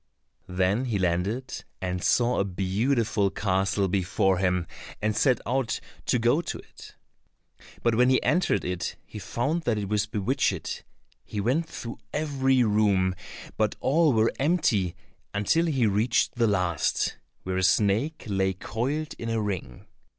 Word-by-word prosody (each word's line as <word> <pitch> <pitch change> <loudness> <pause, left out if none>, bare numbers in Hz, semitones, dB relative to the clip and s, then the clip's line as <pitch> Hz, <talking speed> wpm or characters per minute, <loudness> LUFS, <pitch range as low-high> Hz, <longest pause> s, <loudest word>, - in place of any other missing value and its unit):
Then 95 +7 +1
he 115 -5 -1
landed 95 +8 -1 0.2
and 90 -2 -3
saw 120 0 +2
a - - +3
beautiful 100 +3 0
castle 95 0 0
before 95 0 +1
him, 90 -2 +1 0.3
and 105 +1 0
set 125 -2 +3
out 125 -1 0 0.3
to - - +3
go 120 +7 +3
to - - -5
it. - - -14 0.9
But 115 - +3
when 125 +3 +4
he 130 - +4
entered 175 - +1
it, 90 -1 -3
he 105 - -9
found 140 - -1
that 115 -3 +1
it 100 -2 -3
was 105 -1 +1
bewitched. 110 +6 -1 0.4
He 105 - -5
went 135 +10 0
through 115 -1 -7
every 135 -4 +2
room, 105 -4 +2 0.4
but 110 -1 +1
all 155 +3 +3
were 110 -1 +2
empty 130 - +1 0.4
until 160 +12 +2
he 135 -7 +2
reached 110 +4 +2
the 120 -2 +2
last, 90 -6 0 0.3
where 95 0 -2
a - - +1
snake 105 - +2
lay 95 -3 0
coiled 135 - -3
in 115 - -4
a 115 0 0
ring. 95 - -4
105 Hz, 150 wpm, -26 LUFS, 95-130 Hz, 0.9 s, when